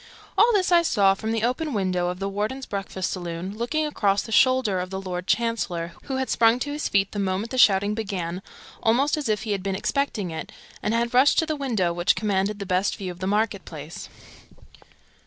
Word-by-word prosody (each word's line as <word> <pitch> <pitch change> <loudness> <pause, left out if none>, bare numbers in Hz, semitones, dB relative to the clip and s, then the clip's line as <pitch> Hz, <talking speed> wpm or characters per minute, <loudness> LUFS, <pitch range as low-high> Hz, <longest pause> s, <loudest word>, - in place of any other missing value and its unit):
All 475 - +5
this 375 -3 +2
I 345 -1 +6
saw 200 -12 +3
from 220 +3 -4
the 225 -1 -1
open 275 +5 -1
window 185 -4 0
of 180 0 -3
the 195 +1 -3
Warden's 215 +7 -3
breakfast 195 -2 -4
saloon, 175 +2 -5
looking 265 +8 -1
across 205 -9 +1
the 225 - -9
shoulder 255 -5 +3
of 180 0 -4
the 190 0 -4
Lord 180 -1 -5
Chancellor, 205 -7 -1
who 270 - -3
had 265 0 -1
sprung 230 +1 +4
to 285 +3 -3
his 295 +1 -2
feet 195 -1 +2
the 205 - -4
moment 195 +3 -1
the 260 - -1
shouting 200 -1 +5
began, 190 -5 -3 0.4
almost 250 +6 +3
as 295 -6 -3
if 215 0 0
he 220 - -3
had 200 -2 -1
been 195 0 -2
expecting 215 - -1
it, 160 - -6 0.3
and 215 - 0
had 235 +1 0
rushed 260 +3 +5
to 320 - +4
the 310 -1 -2
window 225 -12 0
which 175 +1 +2
commanded 205 -1 0
the 200 - -5
best 185 +1 +1
view 185 -2 -4
of 175 - -12
the 185 - -3
market 205 -1 0
place. 155 0 -9
205 Hz, 215 wpm, -24 LUFS, 190-245 Hz, 0.4 s, I